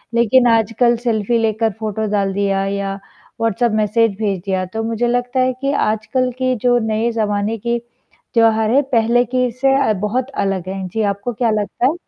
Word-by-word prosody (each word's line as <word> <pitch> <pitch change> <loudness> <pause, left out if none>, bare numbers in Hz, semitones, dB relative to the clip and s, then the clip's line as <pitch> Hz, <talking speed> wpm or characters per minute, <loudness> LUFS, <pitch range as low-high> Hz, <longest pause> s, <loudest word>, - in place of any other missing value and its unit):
लेकिन 240 +2 +4
आजकल 230 +2 +2
सेल्फी 230 0 +1
लेकर 220 0 0
फोटो 215 0 -2
डाल 200 -2 0
दिया 195 0 0
या 195 0 -2 0.5
व्हाट्सएप 230 +1 +1
मैसेज 225 +2 +2
भेज 200 -4 -1
दिया, 190 -1 -1
तो 220 +5 -5
मुझे 230 +1 -1
लगता 245 +1 -1
है 255 0 +2
कि 275 +1 0
आजकल 220 +4 -1
की 255 0 +1
जो 245 0 +4 0.2
नए 230 +2 0
ज़माने 215 0 -1
की 235 +2 -2 0.5
त्योहार 225 -1 +3
है, 280 +3 +4
पहले 240 -2 +2
की 250 +1 0
इससे 255 +3 +1 0.2
अ, 215 - +3
बहुत 220 +7 -2 0.2
अलग 190 -2 -2
है, 190 -1 -4
जी 220 +5 -3
आपको 200 +5 -5
क्या 235 +1 0
लगता 215 +3 -1
है? 300 - +1
225 Hz, 185 wpm, -18 LUFS, 205-245 Hz, 0.5 s, लेकिन